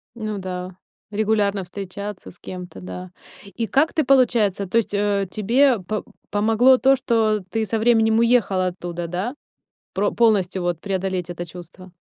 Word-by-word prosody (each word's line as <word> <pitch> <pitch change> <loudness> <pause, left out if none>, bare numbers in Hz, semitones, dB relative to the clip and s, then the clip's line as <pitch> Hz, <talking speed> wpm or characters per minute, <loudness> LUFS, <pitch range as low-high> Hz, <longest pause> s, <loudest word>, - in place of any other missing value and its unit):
Ну 215 -3 -4
да, 185 -1 -6 0.3
регулярно 205 -2 +1
встречаться 200 +2 -7
с 175 - -19
кем-то, 180 -1 -8
да. 180 0 -8 0.4
И 230 - -1
как 305 +4 +2
ты, 310 - +2
получается 230 -7 +3
То 225 - 0
есть, 220 -2 0
э, 200 -1 +1
тебе 240 +3 +3
по 210 +3 -4 0.3
помогло 225 +5 +4
то, 270 +1 +4
что 225 -5 +1
ты 225 -1 -1
со 225 - -1
временем 225 -1 +3
уехала 230 -6 +3
оттуда, 175 -1 -5
да? 190 - -3 0.6
Про 205 +1 +1
полностью 200 -5 +2
вот 175 -2 -2
преодолеть 190 -2 -2
это 175 0 -5
чувство? 180 +2 -12
205 Hz, 155 wpm, -22 LUFS, 185-225 Hz, 0.6 s, помогло